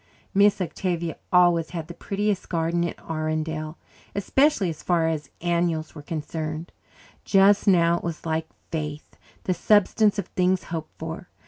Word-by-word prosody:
Miss 200 +1 +5
Octavia 175 -2 -2 0.2
always 175 -2 +4
had 165 -3 -5
the 170 - -8
prettiest 200 +2 -2
garden 170 0 0
in 170 - -2
Arundel, 155 0 -2 0.4
especially 205 - +2
as 155 - -9
far 170 -2 +2
as 155 -3 -2
annuals 170 -2 0
were 150 - -9
concerned. 155 +1 -4 0.5
Just 200 +1 +4
now 170 -3 +5
it - - -15
was 170 -1 -5
like 160 0 -1 0.2
faith 150 -2 -5 0.3
the 185 - +1
substance 205 +3 +3
of 200 - -1
things 185 0 +1
hoped 160 -2 -5
for. 160 +2 -6
170 Hz, 145 wpm, -25 LUFS, 160-185 Hz, 0.5 s, Miss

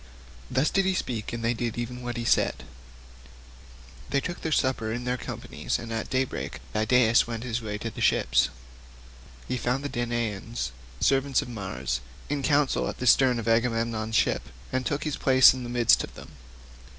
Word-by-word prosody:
Thus 130 +4 +1
did 195 -1 +2
he 190 -1 +1
speak, 115 - -3
and 115 -1 -4
they 115 - +2
did 120 -1 -3
even 120 +1 -4
as 120 - -3
he 120 - -3
had - - -3
said. - - +2 1.5
They 140 - +2
took 175 +5 -5
supper 130 -6 +1
in 120 +2 -3
their 125 0 0
companies - - -4
and 115 -1 -6
at 115 - -3
daybreak 130 0 -2 0.2
Idaeus 115 +1 +4
went 115 -1 -4
his 120 -1 -2
way 105 -2 -4
to 115 +2 -5
the - - -8
ships. 60 +2 +3 1.0
He 130 - -1
found 125 +3 -1
the 145 - -3
Danaans, 115 - -2 0.3
servants 135 0 +2
of - - -10
Mars, 95 - -3 0.3
in 145 -1 -1
council 145 -1 +2
at - - -6
the 125 - -4
stern 125 0 +5
of 115 -1 -4
Agamemnon's 115 -1 +1
ship, - - +2 0.3
and 130 0 -1
took 145 - -1
his 155 -2 -2
place 130 -2 +7
in 130 - -6
the 120 - -6
midst 120 -2 +4
of - - -9
them. - - -11
120 Hz, 185 wpm, -27 LUFS, 115-130 Hz, 1.5 s, place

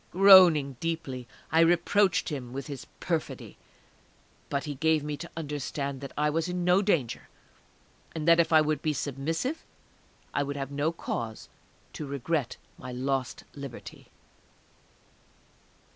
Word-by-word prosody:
Groaning 175 -8 +7
deeply, 145 -7 -4 0.2
I 160 - +4
reproached 175 +3 +3
him 130 -5 -6
with 135 +1 -5
his 140 -4 -8
perfidy; - - -4 0.9
but 140 -1 -1
he 150 - -4
gave 160 +2 +1
me 150 0 -3
to 170 - -8
understand 140 -2 -4
that 140 - -7
I 150 +1 +2
was 165 +3 0
in 180 0 -2
no 180 +2 +4
danger, 165 - -1 0.9
and 160 0 -3
that 170 0 +6
if 170 - +3
I 160 -1 +7
would 155 -1 0
be 155 - 0
submissive 160 - -3 0.7
I - - +1
would 140 0 -3
have 135 0 -4
no 145 +3 0
cause 115 -9 -5 0.4
to 150 - -6
regret 140 0 -2 0.2
my 125 - -7
lost 130 0 -2
liberty. 140 -4 -9
150 Hz, 140 wpm, -28 LUFS, 140-165 Hz, 0.9 s, Groaning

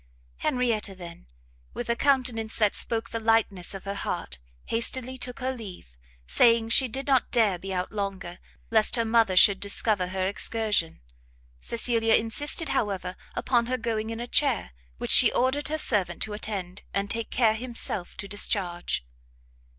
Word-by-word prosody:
Henrietta 225 - -1
then, 170 - -11 0.5
with 240 - -5
a 235 - +1
countenance 245 -5 +1
that 210 -3 +2
spoke 225 -1 -2
the 230 - -3
lightness 220 -5 0
of 195 - -8
her 200 - -4
heart, 65 - -5 0.3
hastily 255 +2 -1
took 250 +1 -7
her 260 +1 -1
leave, 190 - -10 0.3
saying 230 - +3
she 260 +3 +4
did 265 +3 -4
not 265 -3 +2
dare 215 -7 +2
be 195 +2 -7
out 180 -1 -3
longer, 195 -4 -5 0.3
lest 220 0 +3
her 230 -2 0
mother 225 -4 +2
should 195 +1 +6
discover 200 -1 0
her 185 0 -2
excursion. 210 - 0 0.6
Cecilia 230 - +1
insisted, 290 +7 0
however, 195 -7 -2 0.2
upon 235 -2 +1
her 255 +1 -1
going 225 -3 -3
in 225 0 -5
a 240 - -4
chair, 265 - +1 0.3
which - - 0
she - - +9
ordered 260 +4 +1
her 310 - -2
servant 210 - 0
to 215 - -5
attend, 200 -3 -5
and 200 0 0
take 230 0 -3
care 225 -3 +2
himself 230 -5 -2
to 200 - -6
discharge. 175 - -1
220 Hz, 160 wpm, -26 LUFS, 195-240 Hz, 0.6 s, she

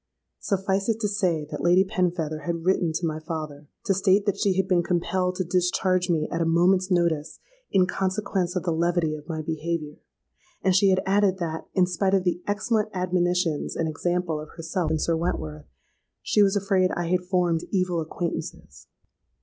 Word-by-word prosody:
Suffice 195 +1 -1
it 225 0 +1
to 210 - +1
say 185 -7 0
that - - -4
Lady 180 +2 +4
Penfeather 170 -6 -2
had 170 -1 -2
written 180 -3 +2
to 160 +2 -2
my 155 -1 -2
father, 155 -2 -6 0.2
to 195 - +3
state 195 +1 +3
that 205 -2 +1
she 195 -3 +1
had 190 -1 +1
been 180 -2 +3
compelled 180 +1 0
to 185 - -1
discharge 180 +1 +1
me 155 -3 +1
at 170 - -1
a - - +3
moment's 180 +3 +3
notice 165 -4 0 0.3
'in 190 -2 +4
consequence 190 -1 -1
of 180 - -1
the 175 - 0
levity 170 -1 +1
of 150 +1 -9
my 160 -1 -3
behaviour;' 160 -1 -3 0.6
and 190 -1 +3
she 195 +1 +5
had 190 0 +2
added 195 -1 +2
that, 165 -3 -4
'in 185 -2 +5
spite 190 +2 +1
of 190 - +1
the 180 -1 -1
excellent 210 +1 0
admonitions 180 -3 0
and 165 - -1
example 175 0 -1
of 155 0 -8
herself 165 0 -2
and 160 0 0
Sir 165 - +1
Wentworth,' 80 - -3 0.6
she 210 - +3
was 200 0 +4
afraid 195 -2 +2
I 175 - -2
had 180 0 +2
formed 180 -2 0
evil 180 -3 0
acquaintances. 150 - -5
180 Hz, 185 wpm, -25 LUFS, 165-190 Hz, 0.6 s, she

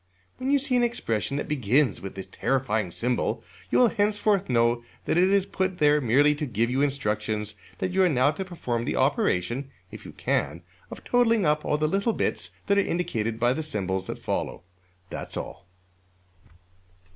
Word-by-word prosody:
When 260 +1 -3
you 285 - +5
see 270 -2 -1
an 245 - +4
expression 140 - -1
that - - -3
begins 135 -1 +1
with 95 -1 -7
this 95 - -6
terrifying 110 -7 -1
symbol, 120 +8 -1 0.3
you - - +2
will 245 -2 +6
henceforth 205 -3 +1
know 120 -1 +2 0.2
that - - +1
it 180 +2 +4
is 200 -1 +3
put 190 -2 -2
there 150 -1 +4
merely 140 +5 +4
to 150 0 -4
give 115 +1 0
you 135 +2 +1
instructions 110 -6 -1 0.2
that 185 - -2
you 190 +1 +2
are 185 - +5
now 135 -1 +3
to 160 +6 -4
perform 125 -11 -3
the - - -1
operation 120 +10 +1 0.2
(if - - -10
you - - -9
can) 85 - -1 0.3
of - - -9
totalling 230 -5 +3
up 150 0 +2
all 150 - +1
the 155 0 +1
little 200 +7 +1
bits - - -1 0.2
that 200 -1 +3
are - - +5
indicated 115 - -2
by 120 +1 +3
the 160 - -3
symbols 95 - -3
that - - -4
follow. - - -3 0.5
That's - - -5
all. - - -7
145 Hz, 185 wpm, -26 LUFS, 115-190 Hz, 0.5 s, will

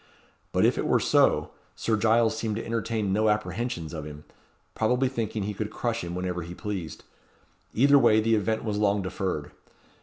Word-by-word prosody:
But, - - +3
if - - +2
it - - -1
were - - +3
so, - - +3 0.2
Sir 115 - 0
Giles 110 +1 +3
seemed 110 -1 -2
to 115 - -4
entertain 115 -3 -1
no 110 +2 +2
apprehensions 105 -5 -2
of 80 -2 -5
him, 75 0 -9 0.5
probably 125 +4 +1
thinking 115 -4 -3
he 105 +1 -3
could 105 +1 -4
crush 115 -1 -2
him 85 0 -5
whenever 90 -1 -3
he 85 +1 -8
pleased. 95 -7 -5 0.7
Either 140 +4 +6
way 110 -4 +5
the 115 +1 +2
event 110 +1 0
was 105 -2 -2
long 100 -1 +2
deferred. 90 -5 -3
105 Hz, 180 wpm, -26 LUFS, 95-115 Hz, 0.7 s, Either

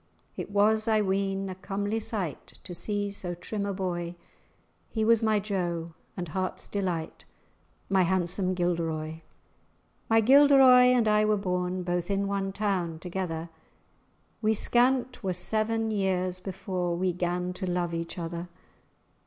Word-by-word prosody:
It - - -5
was, 215 +2 +3
I 220 -1 +3
ween, 195 0 -1
a 190 - -4
comely 200 +3 -3
sight 200 -8 -5
To 180 - -8
see 205 +3 -2
so 180 -3 -4
trim 200 +3 -4
a - - -1
boy; 175 -3 -3 0.7
He 220 -1 -1
was 230 0 +4
my 220 -1 +2
jo, 175 -5 -3 0.2
and 175 -3 -4
heart's 185 +3 -3
delight, 180 -5 -3 0.6
My 195 -1 +3
handsome 185 +1 +1
Gilderoy. 165 -3 -1 0.9
My 225 0 +5
Gilderoy 265 0 +7
and 245 -3 +3
I 210 0 +4
were 215 0 +2
born 180 -1 -2
Both 175 0 -2
in 200 0 0
one 195 -1 -1
town 190 -5 -1
together; 170 -1 -4 0.9
We 220 0 +2
scant 250 +3 +2
were 185 -1 0
seven 220 +4 0
years 185 -3 0
before 185 -2 -3
We 185 0 0
'gan 180 +1 -2
to 185 0 -5
love 175 -1 -1
each 170 +2 -4
other. 170 +1 -5
190 Hz, 145 wpm, -28 LUFS, 175-210 Hz, 0.9 s, Gilderoy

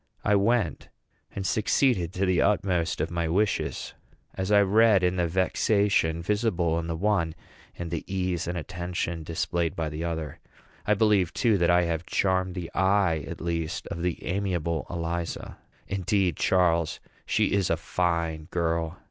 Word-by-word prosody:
I 105 - +2
went, 100 -4 +1 0.4
and 95 - -5
succeeded 110 - +2
to 95 +1 0
the 90 -1 +2
utmost 90 -5 +1
of 80 - -2
my 85 -1 -1
wishes, 100 +6 -1 0.4
as 95 +1 -3
I 105 -1 +6
read 105 -1 +4
in 90 +1 +1
the 90 -1 +1
vexation 95 -1 +1
visible 90 -5 +1
in 80 - -4
the 85 - -2
one, 90 -3 0 0.4
and 85 -1 -5
the 85 - -3
ease 90 -3 -1
and 85 0 -2
attention 85 0 -4
displayed 85 +1 -2
by 80 -2 -2
the 75 +2 -5
other. 80 -4 -4 0.5
I 105 - +4
believe, 105 -5 +3
too, 115 -5 +2
that 85 - +3
I 90 0 +5
have 85 0 -2
charmed 95 -1 0
the 90 -3 -5
eye, 95 -5 +2
at - - -7
least, 85 -2 -2
of 85 - -5
the 90 -1 -2
amiable 90 -4 -1
Eliza. 85 0 -4 0.3
Indeed, 95 -2 0
Charles, 85 -2 +2 0.3
she - - +2
is 100 -3 +1
a 85 - +2
fine 85 -2 -1
girl. 85 0 -1
85 Hz, 160 wpm, -27 LUFS, 85-95 Hz, 0.5 s, I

